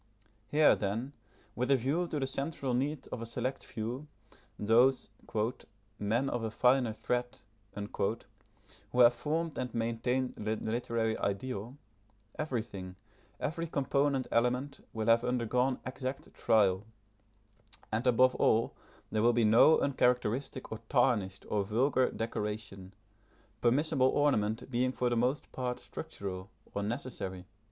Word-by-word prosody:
Here, 150 0 +5
then, 110 +7 -3 0.4
with 125 +2 -1
a 140 - +6
view 140 +8 0
to 155 - -2
the 135 - 0
central 135 -1 -3
need 140 +4 -1
of 115 - -5
a - - -4
select 130 +3 -3
few, 120 +7 -5 0.5
those 120 +5 +3 0.9
"men 115 +6 +1
of 120 -3 -2
a 110 - -1
finer 125 +1 +3
thread" 125 +2 -2 1.5
who 125 - -1
have 120 0 +8
formed 155 +6 -2
and 125 - -3
maintain 115 +3 0
the 110 +1 -2
literary 115 0 -1
ideal, 110 +4 -3 0.6
everything, 110 -10 -4 0.4
every 165 +3 -2
component 140 -2 +1
element, 125 +4 0
will 110 -1 -3
have 115 +1 +5
undergone 125 +1 +1
exact 130 +1 -5
trial, 100 -3 +3 1.1
and, 115 +4 0
above 125 +1 +5
all, 115 +1 +2 0.4
there 110 - +1
will 120 +2 +5
be 115 -1 +3
no 115 +9 +7
uncharacteristic 125 -1 0
or 110 - -4
tarnished 115 -7 +1
or 105 -1 0
vulgar 125 +5 +2
decoration, 105 -3 -4 0.7
permissible 135 +2 +3
ornament 125 -5 +1
being 125 +1 +1
for 125 -1 0
the - - +2
most 125 +5 0
part 125 -1 -3
structural, 95 0 -7 0.2
or 100 - -2
necessary. 100 -5 -4
125 Hz, 130 wpm, -32 LUFS, 110-130 Hz, 1.5 s, have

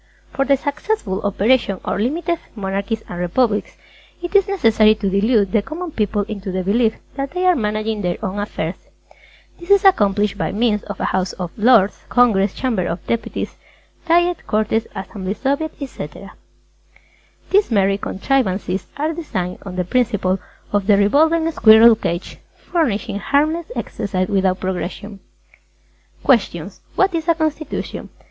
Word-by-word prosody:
For 275 - 0
the 275 0 +3
successful 285 - -2
operation 205 0 +1
of - - -1
Limited 325 - -1 0.2
Monarchies 200 +2 -3
and 175 - -6
Republics, 205 +5 0 0.5
it 350 +3 -5
is 400 0 +5
necessary 225 - +4
to 200 -2 -2
delude 200 0 +2
the 215 - +3
Common 330 - -6
People 210 -4 0
into 200 -2 -6
the 185 0 -2
belief 220 +4 +2 0.2
that 275 +1 -3
they 365 +1 0
are 365 -1 +5
managing 215 -2 -1
their 180 -2 -1
own 200 +1 -3
affairs. 185 -4 -3 0.8
This 345 +2 -12
is 400 0 +5
accomplished 205 - +3
by - - -1
means 210 -1 +1
of 205 - -7
a - - -1
House 185 -1 0
of 180 -2 -5
Lords, 215 -3 +4
Congress, 210 -6 +3
Chamber 225 -9 -1
of 165 +1 -5
Deputies, 230 -1 -3 0.5
Diet, 345 +1 +2
Cortes, 220 +1 0
Assembly, 190 0 -5
Soviet, 280 +5 -1
Etc. 195 - -8 1.2
These 405 +1 +4
merry 195 -3 +2
contrivances 195 -4 -1
are 305 +3 -1
designed 185 - -4
on 185 - -6
the 180 - 0
principle 195 -4 +1 0.3
of 205 -1 +1
the 205 -2 +5
revolving 320 +10 +3
squirrel 225 -3 +7
cage, 175 -5 -4 0.3
furnishing 220 - 0
harmless 310 +7 +1
exercise 190 -2 -2
without 190 -2 +1
progression. 190 +2 -4 1.0
QUESTIONS - - +1
_Q. - - -34
What 380 -1 +3
is 330 0 -2
a 335 - +4
Constitution? 310 -2 -3
215 Hz, 150 wpm, -19 LUFS, 195-285 Hz, 1.2 s, squirrel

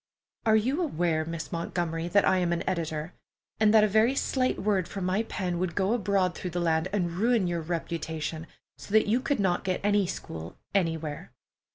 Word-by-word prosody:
"Are 220 - +6
you 255 +10 +1
aware, 170 - 0
Miss 165 0 -5
Montgomery, 170 -1 -2
that 200 +3 +3
I 190 - +4
am 175 -1 +1
an 170 - 0
editor, 160 -2 -2 0.5
and 215 -1 +5
that 215 -1 +6
a - - +5
very 220 +5 +3
slight 255 -2 0
word 195 -3 0
from 195 -2 -4
my 185 +4 +1
pen 180 -6 -3
would 180 -2 -2
go 200 +2 +2
abroad 195 -5 +1
through 180 - -5
the 175 +1 -3
land 165 0 +1
and 180 -4 0
ruin 220 +3 +2
your 175 -1 -1
reputation 160 -1 -4 0.3
so 200 - -9
that 220 - +5
you 225 +4 +3
could 275 0 -1
not 185 -3 +1
get 185 -1 -1
any 205 -2 +3
school 80 - -7 0.2
anywhere?" 160 -6 -1
180 Hz, 195 wpm, -28 LUFS, 165-210 Hz, 0.5 s, Are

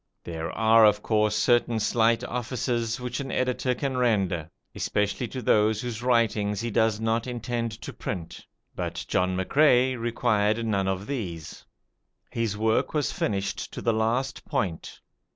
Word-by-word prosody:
There 80 -1 -5
are 110 0 +5
of 105 -1 +4
course 105 -1 +2
certain 120 -2 +2
slight 115 +2 +2
offices 120 -1 -2
which 125 +1 -4
an 135 -1 -4
editor 125 0 0
can 135 -1 -2
render, 95 -9 +1 0.2
especially 105 +4 -1
to 130 +1 -6
those 105 0 +3
whose 120 -2 -5
writings 110 -4 +1
he 115 +1 -3
does 110 0 +2
not 115 +1 0
intend 120 -1 -3
to - - -6
print, 85 -5 -6 0.3
but - - -4
John 90 0 +1
McCrae 130 +4 +3
required 115 -2 0
none 100 -3 0
of 95 +1 -2
these. 90 - -5 0.7
His 115 -3 -2
work 110 +7 +1
was 150 -2 +1
finished 100 -2 -2
to - - -5
the 115 - +2
last 115 +4 -1
point. 85 -5 -3
115 Hz, 150 wpm, -26 LUFS, 105-120 Hz, 0.7 s, are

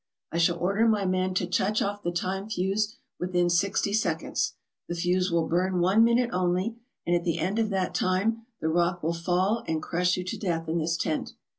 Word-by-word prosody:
I 170 - -1
shall 170 0 +3
order 200 +6 +2
my 210 -3 +2
men 185 0 0
to 185 - +1
touch 190 +4 +1
off 205 +1 -2
the 175 - -1
time 190 +4 -3
fuse 205 +2 0 0.2
within 175 -1 +1
sixty 200 +3 +1
seconds. 175 -7 0 0.3
The 175 - -3
fuse 180 +2 +1
will 165 -1 +1
burn 180 +2 +1
one 190 +6 +5
minute 235 +1 +3
only, 185 +5 0 0.3
and 175 - +2
at 175 - 0
the 170 -2 0
end 185 +7 -1
of 220 -1 +1
that 190 -2 -1
time 220 +5 0
the 160 - 0
rock 175 +1 +1
will 165 +2 +1
fall 180 +6 0
and 160 -1 0
crush 180 +3 0
you 180 - -2
to 185 - -5
death 165 -4 -2
in 165 +1 0
this 165 +1 0
tent." 155 - -2
185 Hz, 205 wpm, -27 LUFS, 175-200 Hz, 0.3 s, one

